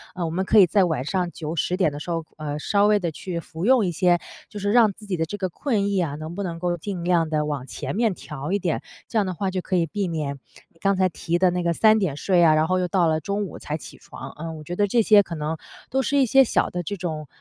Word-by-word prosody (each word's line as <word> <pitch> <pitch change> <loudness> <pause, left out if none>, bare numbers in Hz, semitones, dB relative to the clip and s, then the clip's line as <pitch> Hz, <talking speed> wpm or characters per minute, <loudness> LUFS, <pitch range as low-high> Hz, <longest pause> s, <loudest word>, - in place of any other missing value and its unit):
呃， 180 - -3
我 - - -2
们 185 +4 -2
可 220 - +3
以 200 - +9
在 190 +2 +3
晚 155 -7 -1
上 180 +4 -1
9-10 165 +2 -2
点 180 -5 +2
的 145 - -7
时 160 - -8
候， 165 -1 -1
呃， 150 -1 -4
稍 200 +6 +2
微 210 0 +4
地 170 -3 -2
去 170 +2 -5
服 165 +1 -6
用 245 -4 +5
一 175 - 0
些， 175 +1 +3 0.3
就 - - -10
是 205 +1 0
让 225 -2 +5
自 210 - -14
己 200 -3 -2
的 165 - 0
这 205 - -6
个 185 -2 -2
困 205 - -1
意 200 -2 +1
啊 165 -5 -1
能 155 +3 -7
不 200 - -3
能 170 -3 -4
够 175 0 -1
尽 180 +1 -5
量 170 -2 +2
地 155 -1 +1
往 145 -4 -3
前 - - -5
面 225 -1 +2
调 150 -2 -7
一 200 - +1
点， 175 -4 -1 0.3
这 230 - -3
样 210 - +3
的 185 - -3
话 195 +2 -2
就 185 -1 -2
可 185 - -2
以 170 -2 +3
避 200 +2 -2
免 150 -4 -3 0.4
刚 195 0 +2
才 185 0 +2
提 170 +1 -2
的 185 0 +4
那 180 0 -1
个 170 0 +1
3 220 +4 +5
点 190 -10 -1
睡 175 +3 +2
啊， 160 -2 +6
然 155 +1 +2
后 185 - +1
又 180 - 0
到 180 -2 +2
了 155 -1 +1
中 200 +6 -2
午 - - -9
才 150 - -4
起 150 - -12
床。 - - -10
嗯， 160 0 -6
我 155 - -10
觉 175 +4 -5
得 205 +2 +2
这 235 +4 +3
些 210 -2 +6
可 170 - -8
能 155 +1 -3 0.3
都 265 +1 +1
是 285 +4 0
一 275 - +5
些 270 +4 +6
小 250 - +1
的 175 0 -4
这 200 +4 -4
种， 160 -4 -4
180 Hz, 305 characters per minute, -24 LUFS, 160-200 Hz, 0.4 s, 以